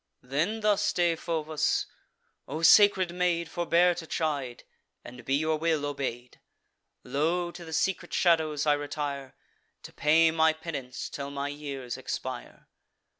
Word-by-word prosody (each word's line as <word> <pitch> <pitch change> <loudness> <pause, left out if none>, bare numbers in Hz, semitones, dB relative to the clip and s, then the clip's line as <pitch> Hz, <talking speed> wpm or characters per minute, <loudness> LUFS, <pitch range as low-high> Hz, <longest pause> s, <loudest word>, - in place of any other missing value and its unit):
Then 160 - -1
thus 210 -1 +2
Deiphobus: 165 -3 0 0.6
"O 155 +4 -5
sacred 190 -1 +6
maid, 175 -2 0
Forbear 175 +1 +2
to 170 -1 -8
chide, 140 -8 -2 0.4
and 125 0 -10
be 135 +3 0
your 155 +2 +1
will 160 -2 0
obey'd! 130 -4 -5 0.6
Lo! 170 +5 0
to 175 - -10
the 160 - -10
secret 185 +4 -1
shadows 160 -4 +2
I 150 - +4
retire, 145 -2 -4 0.5
To - - -11
pay 160 +3 +4
my 160 0 +3
penance 140 -6 -6
till 140 -1 -6
my 140 0 -3
years 140 -4 -6
expire. - - -6
155 Hz, 130 wpm, -28 LUFS, 140-170 Hz, 0.6 s, sacred